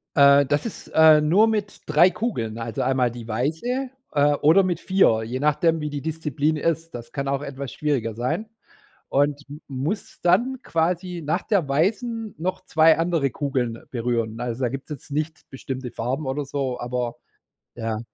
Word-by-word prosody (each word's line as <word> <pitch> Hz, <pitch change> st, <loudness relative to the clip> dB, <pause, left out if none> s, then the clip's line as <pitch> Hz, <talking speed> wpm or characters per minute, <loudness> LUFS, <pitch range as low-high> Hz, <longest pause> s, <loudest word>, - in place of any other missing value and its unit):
Äh, 140 Hz, 0 st, +7 dB
das 145 Hz, +2 st, 0 dB
ist, 230 Hz, -, -7 dB
äh, 160 Hz, -1 st, +8 dB
nur 180 Hz, +9 st, +4 dB
mit 210 Hz, -2 st, -2 dB
3 155 Hz, +4 st, +6 dB
Kugeln, 120 Hz, -, -3 dB
also 115 Hz, -1 st, -4 dB
einmal 130 Hz, -2 st, +2 dB
die 120 Hz, -1 st, -9 dB
weiße 160 Hz, -, -1 dB, 0.2 s
äh, 145 Hz, 0 st, +4 dB
oder 160 Hz, +7 st, +5 dB
mit 175 Hz, -3 st, -1 dB
4, 185 Hz, -15 st, +3 dB
je 120 Hz, +3 st, -4 dB
nachdem, 160 Hz, +2 st, +2 dB
wie 150 Hz, -, -2 dB
die 145 Hz, -1 st, -4 dB
Disziplin 155 Hz, -1 st, -1 dB
ist. 165 Hz, 0 st, -2 dB
Das 120 Hz, -1 st, -8 dB
kann 140 Hz, -2 st, -3 dB
auch 140 Hz, 0 st, 0 dB
etwas 140 Hz, -2 st, -6 dB
schwieriger 135 Hz, -7 st, -1 dB
sein 155 Hz, -, -2 dB, 0.6 s
und 145 Hz, +1 st, +1 dB
m 150 Hz, +2 st, -9 dB
muss 145 Hz, +10 st, -4 dB
dann 235 Hz, +10 st, +2 dB
quasi 175 Hz, +2 st, -1 dB
nach 155 Hz, -, 0 dB
der 195 Hz, -9 st, +1 dB
weißen 215 Hz, -, 0 dB
noch 185 Hz, +4 st, -3 dB
2 160 Hz, -2 st, +5 dB
andere 165 Hz, -4 st, +1 dB
Kugeln 130 Hz, -5 st, -2 dB
berühren. 115 Hz, -2 st, -1 dB
Also 120 Hz, +1 st, -3 dB
da 125 Hz, -, +2 dB
gibt 135 Hz, +2 st, -6 dB
es -, -, -26 dB
jetzt 145 Hz, 0 st, -8 dB
nicht 155 Hz, +3 st, -3 dB
bestimmte 130 Hz, -2 st, -6 dB
Farben 130 Hz, +6 st, -3 dB
oder 140 Hz, +2 st, -2 dB
so, 135 Hz, -2 st, -3 dB
aber 120 Hz, -1 st, -3 dB, 0.6 s
ja. 115 Hz, -2 st, -3 dB
145 Hz, 175 wpm, -24 LUFS, 130-165 Hz, 0.6 s, äh